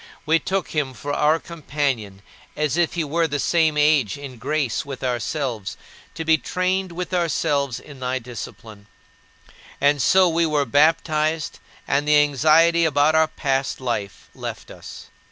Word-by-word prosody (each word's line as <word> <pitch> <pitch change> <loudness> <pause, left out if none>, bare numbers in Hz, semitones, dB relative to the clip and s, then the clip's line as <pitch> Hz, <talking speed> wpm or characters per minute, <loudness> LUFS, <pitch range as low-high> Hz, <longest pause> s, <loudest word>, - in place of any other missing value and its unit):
We 160 +1 +3
took 190 +1 -2
him 140 -4 -2
for 145 +6 -5
our 155 +2 +3
companion, 140 - -4 0.3
as 150 -1 0
if 175 -1 +1
he 170 - 0
were 165 +3 0
the 145 -1 -2
same 160 +1 +2
age 150 -5 +3
in 135 -4 -9
grace 140 0 -1
with 140 -3 -8
ourselves, 125 -3 -3 0.4
to 165 - -5
be 160 -1 +4
trained 185 +2 -1
with 180 +2 -5
ourselves 145 -6 0
in 140 -3 -13
thy 130 0 -1
discipline. 115 -3 -9 0.9
And 145 0 +3
so 185 +8 +5
we 165 0 +1
were 150 -2 +1
baptized 155 +3 +1 0.3
and 145 +2 0
the 150 0 +5
anxiety 155 +4 +4
about 150 -1 +3
our 160 0 +4
past 135 -3 -2
life 105 -7 -4
left - - -7
us. - - -11
150 Hz, 155 wpm, -22 LUFS, 130-160 Hz, 0.9 s, so